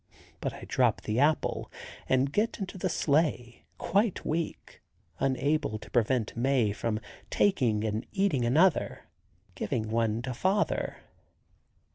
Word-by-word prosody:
But - - -3
I - - -10
drop - - +2
the 110 +3 -1
apple 150 +2 +1 0.4
and 130 +2 +2
get 225 +3 +1
into 190 -2 -6
the 185 - 0
sleigh, 145 -7 0
quite 200 0 0
weak, 165 +1 -3 0.4
unable 140 -2 0
to 105 - -13
prevent 120 -1 +1
Mae 120 -3 +2
from 110 +1 -2 0.3
taking 120 - +2
and 110 0 -2
eating 190 -11 +1
another, 155 +9 +2 0.5
giving 110 +2 -2
one 115 0 0
to 130 0 -3
father. 190 - 0
130 Hz, 125 wpm, -29 LUFS, 115-165 Hz, 0.5 s, drop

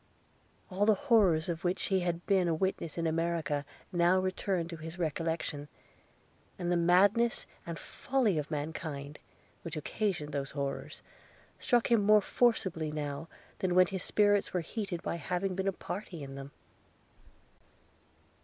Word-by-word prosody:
All 200 +3 +1
the 215 - +6
horrors 195 - +3
of 170 -1 -3
which 180 0 0
he 190 -1 +2
had 175 -1 -2
been 190 -3 +3
a 165 - +2
witness 170 -2 -2
in 170 - -1
America 160 -3 0 0.3
now 175 0 +4
returned 185 -2 -1
to 165 - -6
his 160 +2 -8
recollection; 160 -2 -2 0.9
and 175 -1 -2
the - - +3
madness 200 +7 +4 0.2
and 170 -1 -4
folly 230 - 0
of 150 - -4
mankind, 150 -1 -4 0.4
which 165 -1 -6
occasioned 175 -2 -2
those 140 -1 -2
horrors, 140 -1 -4 0.6
struck 240 -1 +2
him 230 -3 +5
more 210 +1 +6
forcibly 190 -8 +1
now 150 +1 -4 0.3
than 180 -2 0
when 185 0 +7
his 190 0 -4
spirits 205 0 +2
were 180 - +2
heated 180 -1 -4
by - - -2
having 180 +4 -1
been 190 +1 -2
a - - +3
party 180 -4 -6
in 135 0 -7
them. 135 0 -7
175 Hz, 150 wpm, -31 LUFS, 160-195 Hz, 0.9 s, when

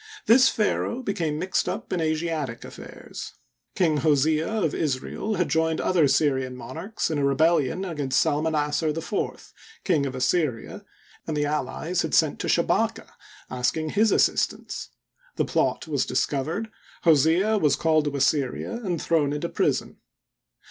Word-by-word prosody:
This 250 +3 +6
pharaoh 230 +3 -1
became 165 -9 -2
mixed 185 +4 -1
up - - -5
in 175 - 0
Asiatic 155 -6 -2
affairs. - - -9 0.4
King 160 -5 +2
Hosea, 155 +2 +2
of 195 -9 0
Israel, 155 +8 -2
had 180 - 0
joined 160 0 +1
other 170 -5 +3
Syrian 135 -2 +1
monarchs 165 - -4
in 150 - -1
a - - 0
rebellion 155 +4 +2
against 145 -7 -1
Salmanassar 150 0 0
IV, 165 +5 -4 0.3
King 155 -7 +1
of 130 - -6
Assyria, 130 -2 -1 0.4
and 155 -2 -2
the 145 - +1
allies 150 +4 -2
had - - -1
sent - - +2
to - - -3
Shabaka, - - +1 0.4
asking 130 +5 -1
his 215 +1 +3
assistance. - - 0 0.5
The - - 0
plot - - 0
was 145 -4 -1
discovered, 150 - -1 0.3
Hosea 170 +7 +4
was 150 -6 +3
called 155 -2 +2
to 145 -1 -2
Assyria 140 - 0
and 175 -5 -2
thrown 150 -4 +1
into 150 +4 -3
prison. - - -1
155 Hz, 140 wpm, -25 LUFS, 145-170 Hz, 0.5 s, This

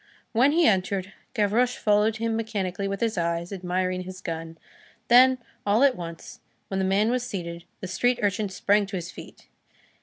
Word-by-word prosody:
When 260 +6 +4
he 335 0 +4
entered, 190 -1 +1 0.2
Gavroche 235 +3 +2
followed 210 +1 +2
him 225 0 -1
mechanically 200 -4 -2
with 195 0 -4
his 225 -5 0
eyes, 170 +2 -2
admiring 185 0 -1
his 185 0 -8
gun; 165 -2 -6 0.5
then, 255 +2 +7 0.3
all 210 +5 +3
at 275 -2 +5
once, 170 -3 -8 0.3
when 195 - -2
the 190 - +1
man 200 +4 +2
was 250 0 0
seated, 175 -7 -6 0.2
the 185 - -4
street 245 +7 +1
urchin 205 0 0
sprang 200 +2 +2
to 195 - -6
his 175 -1 -5
feet. - - -13
200 Hz, 175 wpm, -26 LUFS, 185-225 Hz, 0.5 s, then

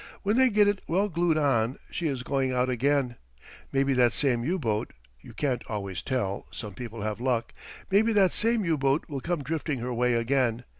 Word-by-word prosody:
When 205 +2 +1
they 260 +1 +5
get 210 -2 +4
it 205 -2 +1
well 195 +5 +1
glued 170 -2 +1
on 130 -5 +1
she 170 - -2
is 135 -4 -2
going 135 -1 0
out 125 0 +1
again. 130 0 +1 0.5
Maybe 135 0 +2
that 125 -2 +3
same 125 -5 +1
U 175 +8 0
boat 110 - -2 0.3
you - - -13
can't 130 -5 -1
always 100 -4 -4
tell, 100 -7 -2
some 105 -2 -7
people 115 +1 -7
have 105 0 -3
luck 125 -3 -1 0.4
maybe 215 +4 +4
that 195 -3 +4
same 230 -2 +2
U 160 -3 +1
boat 135 +2 +1
will 140 -4 -5
come 170 -2 -2
drifting 155 0 -2
her 125 +1 -3
way 125 0 +2
again. 120 0 +1
135 Hz, 200 wpm, -27 LUFS, 120-165 Hz, 0.5 s, they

